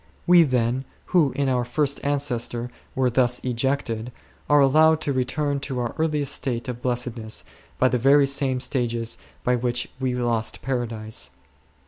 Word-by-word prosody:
We, 175 0 +7
then, 130 -3 +1 0.3
who 160 -7 +4
in 140 -1 0
our 125 -2 +1
first 140 +3 0
ancestor 125 -4 -1 0.2
were 130 -1 +2
thus 125 0 +2
ejected, 125 -2 -1 0.4
are 145 0 +6
allowed 155 +3 +5
to 140 - 0
return 140 +3 -1
to 135 -2 -5
our 120 -2 -2
earliest 150 -3 +1
state 120 -2 -2
of 125 -1 -5
blessedness 120 -3 -2 0.3
by 130 - +4
the 125 -1 +1
very 140 +3 +5
same 135 -2 0
stages 120 -3 -2 0.2
by 125 - +2
which 120 0 -1
we 130 -2 -1
lost 120 -2 -1
Paradise. 115 - -3
125 Hz, 150 wpm, -24 LUFS, 120-140 Hz, 0.4 s, We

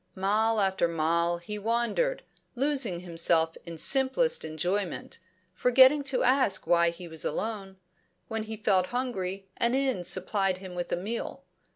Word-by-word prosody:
Mile 215 +3 +1
after 190 -3 +1
mile 170 +1 0
he 210 +5 -7
wandered, 235 - 0 0.3
losing 260 -9 0
himself 165 -2 +1
in 165 -1 -7
simplest 275 - +2
enjoyment, 175 +5 -3 0.3
forgetting 260 +7 +5
to 265 -2 +1
ask 255 -5 +2
why 170 0 +3
he 170 +1 -9
was 160 -1 -5
alone. 195 +2 -4 0.5
When 225 -1 -3
he 220 0 -6
felt 190 -4 +2
hungry, 195 -6 -3
an 235 +2 +1
inn 265 -8 0
supplied 190 +1 0
him 185 -1 -9
with 175 -1 -5
a - - +2
meal. 215 +6 -5
195 Hz, 145 wpm, -28 LUFS, 175-245 Hz, 0.5 s, forgetting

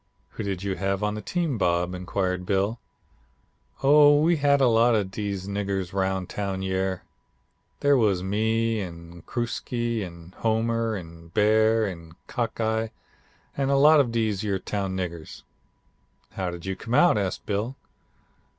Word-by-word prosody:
"'Who - - -7
did 100 -3 -3
you 95 -1 -2
have 100 +1 -1
on 105 0 0
the 105 - -5
team, 165 -7 -2
Bob?' 90 0 +1
inquired 90 0 -2
Bill. 100 +5 0 1.0
"'Oh 145 +1 +7
we 165 +2 +3
had 140 -1 +3
a 135 - +4
lot 115 0 +4
of 100 -3 -1
dese 100 -2 -4
niggers 100 -2 -3
roun' 95 -1 0
town 95 0 -4
yere. 95 -1 -1 0.8
They 145 0 +4
was 105 -8 +2
me, 110 +3 0
an' 85 -1 -9
Crooksie, 120 -1 -2
an' 85 0 -10
Homer, 115 0 0
an' 85 -3 -9
Bear, 110 +1 +4
an' 85 -4 -7
Cockeye, 110 -2 -1 0.7
an' 135 -1 0
a 140 - +3
lot 150 +2 +7
of 130 -5 +2
dese 110 -4 0
yer 100 -3 -1
town 95 0 -3
niggers.' 85 -3 -6 0.9
"'How 95 -2 -3
did 85 0 -8
you 95 0 -2
come 115 +5 -3
out?' 175 -10 +5
asked 95 -2 -3
Bill. 105 +6 -2
105 Hz, 150 wpm, -25 LUFS, 95-115 Hz, 1.0 s, Oh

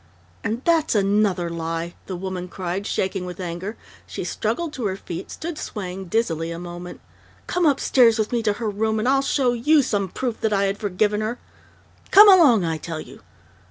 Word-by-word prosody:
"And 230 +5 -2
that's 325 -6 +2
another 200 -3 +2
lie!" 165 0 -4
the 185 - -4
woman 185 0 -5
cried, 185 +2 -4
shaking 190 -1 -1
with 180 0 -7
anger. 180 +4 -5 0.3
She - - -5
struggled 340 -3 -2
to 245 -7 -2
her 190 - -2
feet, 180 -1 -7
stood 325 -1 -6
swaying 190 -2 -6
dizzily 170 -5 -1
a 170 - -5
moment. 175 0 -8 0.4
"Come 355 -2 +1
upstairs 250 -4 +4
with 215 -1 -1
me 240 -1 +1
to 215 -2 +1
her 225 +1 -4
room, 220 +1 0
and 215 +3 -1
I'll 270 +1 +4
show 265 -2 +1
you 290 +5 +3
some 205 -6 -1
proof 245 +3 -4
that 220 -1 +1
I 200 0 +2
had 195 +1 -1
forgiven 210 +1 0
her!... 220 +3 -2 0.7
Come 415 +2 +9
along, 295 - +6
I 160 -1 -2
tell 160 0 -5
you!... - - -11
205 Hz, 190 wpm, -23 LUFS, 180-240 Hz, 0.7 s, Come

